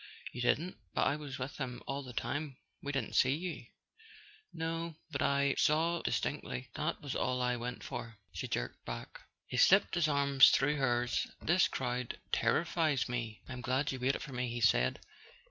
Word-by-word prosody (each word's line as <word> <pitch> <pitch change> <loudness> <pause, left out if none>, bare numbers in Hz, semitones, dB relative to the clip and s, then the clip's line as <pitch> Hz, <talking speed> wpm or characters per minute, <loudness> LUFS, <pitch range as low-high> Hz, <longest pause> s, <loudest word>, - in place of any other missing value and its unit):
"You 125 - -5
didn't? 165 +8 +1 0.2
But - - +3
I - - +2
was 145 -3 -6
with 130 +2 -5
him 125 -3 -4
all 140 +1 -3
the 130 -2 -8
time. 135 +3 -3 0.2
We 145 - -3
didn't 135 -5 -2
see 130 +2 +4
you 175 +2 -5 0.4
" 425 0 -22 0.2
"No, 165 0 -3 0.2
but 140 -3 -2
I 140 0 +3
saw—distinctly. 155 - 0
That - - -2
was 140 -3 -3
all 125 0 0
I 125 0 +1
went 120 +1 -5
for," 115 -1 -6 0.2
she - - -4
jerked - - -3
back. - - -7 0.3
He 125 - -4
slipped 195 +10 +6
his 175 -3 +3
arm 140 -2 0
through 145 +2 +7
hers. 120 -2 +1
"This 175 +3 +4
crowd 125 -1 -3 0.2
terri¬ 115 +9 +3
fies 160 -6 +1
me. 115 -3 -4
I'm 130 -1 -6
glad 130 +4 0
you 130 - -4
waited 130 +2 0
for 135 - -8
me," 125 0 -1
he 120 +1 -3
said. 65 - +3
135 Hz, 180 wpm, -33 LUFS, 125-150 Hz, 0.4 s, through